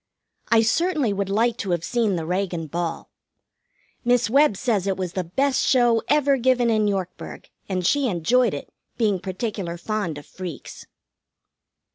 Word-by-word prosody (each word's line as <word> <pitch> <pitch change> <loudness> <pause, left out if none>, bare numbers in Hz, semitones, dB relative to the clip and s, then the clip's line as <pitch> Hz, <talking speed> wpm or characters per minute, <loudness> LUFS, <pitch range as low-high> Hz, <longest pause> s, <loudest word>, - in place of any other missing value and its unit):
I 230 -1 +5
certainly 300 - +1
would 200 -1 -2
like 230 +3 +1
to 205 -6 -4
have 170 -2 0
seen 225 -3 0
the 165 -2 -3
Reagan 180 -1 -2
ball. 170 +2 -4 0.9
Miss 245 -2 +2
Webb 275 -6 +4
says 210 -6 0
it 190 -1 0
was 180 -2 -4
the 185 -2 -2
best 265 +11 0
show 240 -3 +3
ever 285 -2 +3
given 250 -1 +2
in 215 -1 +2
Yorkburg, 190 -3 -4 0.2
and 185 -2 -1
she 285 +6 +2
enjoyed 220 +3 +2
it, 140 - -9 0.2
being 210 -5 +1
particular 190 -2 -4
fond 195 -4 -3
of 145 - -10
freaks. 180 -6 -9
210 Hz, 155 wpm, -23 LUFS, 180-245 Hz, 0.9 s, I